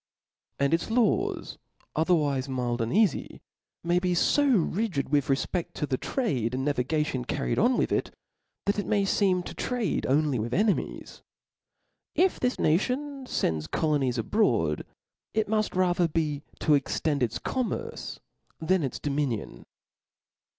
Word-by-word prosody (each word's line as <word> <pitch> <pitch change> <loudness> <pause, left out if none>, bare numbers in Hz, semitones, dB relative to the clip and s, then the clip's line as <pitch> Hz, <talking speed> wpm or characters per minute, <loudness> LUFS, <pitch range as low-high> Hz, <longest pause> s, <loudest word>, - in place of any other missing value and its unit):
And 140 +2 +1
its 165 - 0
laws, 250 - 0 0.4
otherwife 150 -5 +1
mild 125 -2 -1
and 115 - -1
eafy, 210 -4 +1 0.4
maybe 180 +1 +1
ib 250 - +3
rigid 190 -12 -1
with 145 -1 +2
refpedt 155 +5 -1
to 150 - -1
the 130 -3 -2
trade 130 - -1
and 130 +1 -2
navigation 145 -1 0
carried - - -1
on 245 +3 +3
with - - +1
it, - - 0 0.6
that 200 +1 +1
it 205 - -3
may 205 -2 +2
feem 190 -2 +2
to - - -6
trade. 245 -8 -1
only 145 -2 +2
with 115 +3 -2
enemies. 210 +1 -1 0.9
If 370 +1 +3
this 250 0 0
nation 260 - 0
fends 80 - -1
colonies 135 - 0
abroad, 115 - +1 0.5
it 220 -1 +2
muft 215 -1 0
ra 185 -1 +3
ther 175 -1 +2
be 150 -3 -1 0.2
to 155 - +3
extend 145 +1 +1
its 115 -3 0
commerce 255 -3 -3 0.4
than 180 +3 +2
its 135 -4 -2
dominion. 140 - -3
160 Hz, 140 wpm, -27 LUFS, 135-210 Hz, 0.9 s, ib